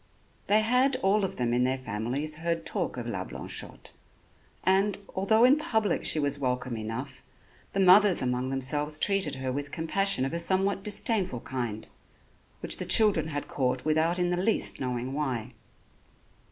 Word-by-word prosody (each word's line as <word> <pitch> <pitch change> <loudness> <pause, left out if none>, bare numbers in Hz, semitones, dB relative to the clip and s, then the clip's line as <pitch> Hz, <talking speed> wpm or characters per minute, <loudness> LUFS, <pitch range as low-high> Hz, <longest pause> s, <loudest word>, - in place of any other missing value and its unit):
They 210 +2 +4
had 250 +4 +2
all 200 +2 +2
of 190 - -2
them 120 -1 -1
in 125 +1 +2
their 130 +1 0
families 130 +6 -4
heard 165 0 -3
talk 165 - -3
of 120 - -5
La 100 -6 -4
Blanchotte; - - -7 0.7
and, 195 +2 +2 0.2
although 220 +4 +2
in 260 +4 +6
public 220 - -1
she - - +4
was 145 -1 +1
welcome 125 -2 -2
enough, 130 +4 -6 0.5
the 195 - -1
mothers 190 0 +6
among 125 0 -1
themselves 145 +3 -1
treated 195 -1 +1
her 130 -1 -4
with 145 +2 -5
compassion 185 -1 +1
of 135 - -4
a 170 - -1
somewhat 190 +3 +1
disdainful 200 - 0
kind, 120 -5 -5 0.7
which - - +3
the - - -4
children 205 -8 +5
had 145 -2 -5
caught 130 -1 -2
without 160 +3 +1
in 175 -1 0
the 175 - 0
least 195 +5 0
knowing 125 0 -3
why. 130 -5 -3
155 Hz, 165 wpm, -27 LUFS, 130-195 Hz, 0.7 s, in